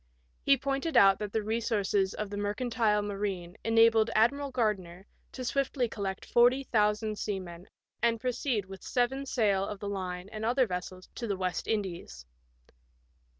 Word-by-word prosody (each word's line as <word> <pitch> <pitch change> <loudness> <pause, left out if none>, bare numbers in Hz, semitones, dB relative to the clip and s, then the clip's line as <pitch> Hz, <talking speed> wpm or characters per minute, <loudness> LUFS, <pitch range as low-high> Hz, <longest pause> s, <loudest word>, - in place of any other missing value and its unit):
He 275 -1 +4
pointed 275 +4 -1
out 195 -1 +6
that 210 -1 -4
the 220 0 -1
resoiurces 205 -3 0
of 210 -1 -4
the - - -4
mercantile 210 0 0
marine 195 -3 -4
enabled 225 0 +4
Admiral 280 +6 +3
Gardner 200 -7 -2 0.3
to 255 - -6
swiftly 270 -1 0
collect 200 -4 -4
forty 245 +3 +4
thousand 215 -2 +1
seamen 185 -3 -5 0.3
and 230 -1 +2
proceed 250 -3 -1
with 190 0 -10
seven 265 +3 -1
sail 205 -7 +2
of 205 +1 -4
the 205 - -4
line 185 -2 -4
and 215 0 -6
other 250 +3 +3
vessels 185 -1 -6
to 235 - -5
the 200 -2 -1
West 185 -1 -2
Indies. 180 - -3
210 Hz, 150 wpm, -30 LUFS, 195-240 Hz, 0.3 s, out